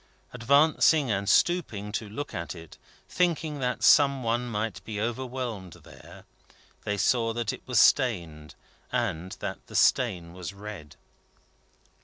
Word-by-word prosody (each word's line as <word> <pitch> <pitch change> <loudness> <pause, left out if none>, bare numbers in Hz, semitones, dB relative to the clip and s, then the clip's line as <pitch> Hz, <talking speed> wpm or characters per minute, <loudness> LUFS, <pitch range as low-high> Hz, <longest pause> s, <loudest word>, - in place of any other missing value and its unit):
Advancing 140 +2 +3
and 100 -1 -1
stooping 110 - +1
to 105 0 -4
look 145 +7 -6
at 85 -1 -5
it, 80 -2 -13 0.3
thinking 165 -4 -1
that 125 -1 -2
some 140 -4 +5
one 120 +2 -1
might 110 0 -3
be 105 -2 -5
overwhelmed 120 -5 -4
there, - - -15 0.6
they 105 0 -1
saw 115 +2 +1
that 115 -2 -2
it - - -9
was 125 -4 +2
stained, 85 - +2 0.4
and 95 -8 -2
that - - -4
the - - -11
stain 90 -9 +2
was 90 +1 -7
red. 100 -7 -9
115 Hz, 135 wpm, -27 LUFS, 100-130 Hz, 0.6 s, some